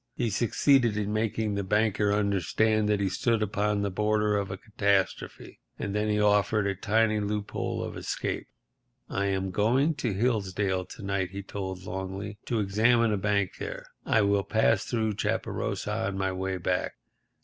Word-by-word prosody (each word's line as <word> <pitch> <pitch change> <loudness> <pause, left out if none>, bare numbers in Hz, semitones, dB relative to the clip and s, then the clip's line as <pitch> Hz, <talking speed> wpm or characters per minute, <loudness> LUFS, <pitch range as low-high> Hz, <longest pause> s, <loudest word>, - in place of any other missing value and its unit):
He 115 -2 -1
succeeded 120 +1 +3
in 105 0 -1
making 110 -1 0
the 100 0 -1
banker 105 +1 +2
understand 105 +2 +1
that 105 -1 +2
he 100 - +1
stood 110 +4 +1
upon 105 0 0
the 100 - -1
border 105 +1 +1
of 100 -2 -1
a 95 - -5
catastrophe. 100 -2 -1 0.2
And 100 - -3
then 105 +1 0
he 105 0 +1
offered 105 0 +3
a 100 - +1
tiny 110 +2 +2
loophole 105 0 -2
of - - -6
escape. - - -3 0.6
"I 100 +1 0
am 95 -1 -1
going 125 - +2
to 125 -5 -1
Hilldale's 95 -4 -1
to 110 - -11
night," 95 -2 -1
he 100 +1 -6
told 95 -2 -5
Longley, 95 +2 -5
"to 115 - 0
examine 110 +3 +3
a - - +1
bank 100 -1 0
there. - - -5 0.2
I 110 - +3
will 100 0 +2
pass 110 -1 +2
through 110 -4 -1
Chaparosa - - -2
on 95 0 -3
my 95 0 0
way 95 0 -2
back. 90 +1 -1
105 Hz, 170 wpm, -28 LUFS, 95-110 Hz, 0.6 s, succeeded